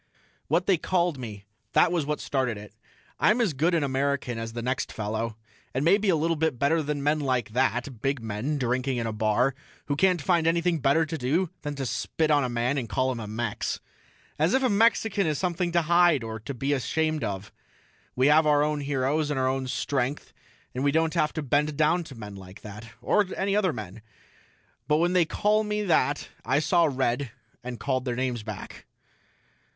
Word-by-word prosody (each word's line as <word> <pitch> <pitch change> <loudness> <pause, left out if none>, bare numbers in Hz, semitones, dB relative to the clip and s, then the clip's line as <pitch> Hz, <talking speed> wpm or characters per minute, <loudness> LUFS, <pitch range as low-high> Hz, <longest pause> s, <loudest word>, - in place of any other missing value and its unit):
What 170 +5 +1
they 190 -3 +3
called 175 -3 0
me, 105 -5 -8 0.3
that 175 - +5
was 165 -5 0
what 150 0 -1
started 130 -5 -1
it. 105 0 -11 0.5
I'm 215 +4 +4
as 220 -9 +2
good 165 +6 +1
an 160 - +1
American 135 -3 -1
as 115 0 -5
the 120 0 -4
next 130 +2 -2
fellow, 110 +1 -3 0.4
and 135 +3 0
maybe 200 +4 +4
a 180 - +4
little 165 +2 +1
bit 155 -4 0
better 145 +5 +2
than 145 -1 -3
men 150 +2 +2
like 130 -6 -1
that, 125 0 -1
big 135 0 0
men 115 +7 -3
drinking 130 0 0
in 115 - -1
a 110 - -2
bar 110 +5 +2 0.3
who 145 - -1
can't 180 +3 +3
find 165 +1 +2
anything 170 0 +2
better 140 +4 +3
to 155 0 -5
do 155 +8 0
than 145 -1 -4
to 135 -1 -3
spit 155 +5 -1
on 145 -1 +4
a 125 - -1
man 120 +4 0
and 115 -4 -6
call 130 +6 +1
him 110 -3 -6
Mex. 115 -2 -2 0.6
As 160 - +3
if 265 - +2
a 255 - +3
Mexican 205 -2 +2
is 155 -2 0
something 175 0 -1
to 170 -1 +3
hide 170 -4 +4
or 110 0 -5
to 110 +6 -6
be 135 +4 0
ashamed 155 +3 0
of. 100 0 -4 0.6
We 130 - +2
have 155 +2 +5
our 145 -1 +4
own 150 0 0
heroes 145 +2 0
and 145 -3 -1
our 130 - +2
own 130 0 -1
strength 130 +1 -2 0.4
and 130 - -2
we 140 - +3
don't 160 +1 +1
have 150 - +1
to 155 - -3
bend 145 +2 +1
down 160 +3 +3
to 135 - -11
men 105 -3 -8
like 95 0 -12
that, 105 +2 -9
or 210 -2 +3
any 195 +1 0
other 200 -4 +2
men. 110 -5 -8 0.9
But 150 +1 +3
when 175 +3 +2
they 180 -2 +4
called 210 +5 +1
me 210 0 -1
that 155 -5 +1 0.2
I 130 +4 +1
saw 165 +2 +3
red 130 0 0 0.3
and 125 -1 -6
called 130 -2 -1
them 120 -2 -1
names 125 -2 -1
back. 105 -2 -8
140 Hz, 205 wpm, -26 LUFS, 125-165 Hz, 0.9 s, that